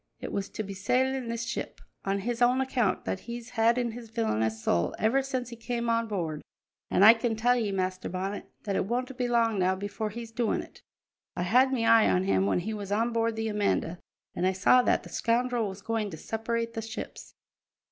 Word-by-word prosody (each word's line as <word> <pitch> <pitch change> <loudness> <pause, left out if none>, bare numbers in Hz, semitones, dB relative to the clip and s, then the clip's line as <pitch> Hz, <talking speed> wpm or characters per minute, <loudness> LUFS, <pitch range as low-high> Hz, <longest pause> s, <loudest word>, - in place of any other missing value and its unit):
It - - -6
was 200 -1 -3
to 215 - -4
be 200 -1 -6
sailin' 255 +6 0
this 230 0 -3
ship 230 - -4 0.3
on 195 0 0
his 240 +2 -3
own 250 +2 +4
account 250 -7 0
that 185 - -2
he's 235 0 -6
had 230 0 +3
in 240 -2 0
his 230 0 -9
villainous 110 - -1
soul 85 -1 +1
ever 235 +5 +2
since 260 -2 -3
he 235 - -8
came 235 0 -2
on 230 0 +1
board; 165 -8 -3 0.5
an' 190 - +3
I 220 +2 +11
can 230 0 -1
tell 240 +3 +3
ye, 220 -4 0
Master 185 -1 -2
Bonnet, 190 +2 -4
that 200 -2 -2
it - - +1
won't 250 +3 -2
be 250 -1 -1
long 230 -3 +2
now 185 +1 +2
before 205 +2 -4
he's 230 +1 -7
doin' 230 -1 0
it. - - -16 0.5
I 175 - -1
had 250 +8 +4
me 240 -4 0
eye 225 -1 +6
on 90 0 +2
him 95 0 +2
when 140 - +1
he 220 +5 -4
was 200 -2 -6
on 230 +3 +1
board 230 -1 +1
the 225 0 -2
Amanda, 200 -4 0 0.3
an' 175 - -1
I 190 - +3
saw 200 +7 +5
that - - +1
the - - -11
scoundrel 235 -1 0
was 195 +1 -10
goin' 225 -2 -1
to 160 - -8
separate 230 +4 -3
the 225 - -3
ships." 225 0 -8
225 Hz, 220 wpm, -28 LUFS, 195-240 Hz, 0.5 s, I